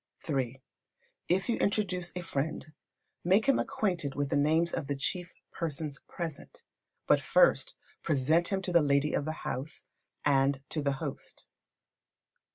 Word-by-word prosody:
iii. 135 -4 -1 0.7
If 185 +2 +1
you 235 - +1
introduce 185 -4 0
a 180 - -4
friend, 155 -1 -2 0.6
make 190 +5 +4
him 275 -1 +4
acquainted 175 -9 -1
with 145 -1 -1
the - - +2
names 160 +4 +3
of 140 - -2
the 140 - -1
chief 175 +6 -3 0.2
persons 150 -3 -3
present. 165 -4 -6 0.4
But - - +4
first - - +3 0.3
present 155 +3 +2
him 190 -1 0
to 185 - -2
the 170 - +7
lady 140 0 +2
of 145 - 0
the 155 - -1
house, 135 +5 -4 0.4
and 135 -1 +3
to 155 - -1
the 140 -1 +1
host. 135 - -6
155 Hz, 150 wpm, -30 LUFS, 140-175 Hz, 0.7 s, the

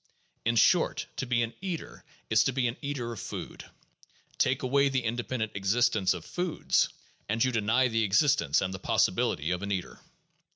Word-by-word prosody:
In 115 +1 +2
short, - - +3
to 135 - -3
be 120 -1 +2
an 115 0 -4
eater 185 -4 -6 0.2
is - - +4
to - - +2
be 130 -1 0
an 115 - -3
eater 135 -5 -3
of 110 - -8
food; - - -7 0.7
take 130 +1 +1
away 140 +2 +3
the 130 -2 -1
independent 120 -1 -2
existence 100 0 +2
of - - -8
foods, 180 -2 0 0.4
and 110 +2 +1
you 130 - +2
deny 115 +3 +2
the 115 -2 0
existence 95 - +3
and 95 -1 -2
the 95 - -6
possibility 80 -3 +1
of 90 0 -1
an 100 0 -4
eater. 95 -3 -4
115 Hz, 175 wpm, -28 LUFS, 100-130 Hz, 0.7 s, is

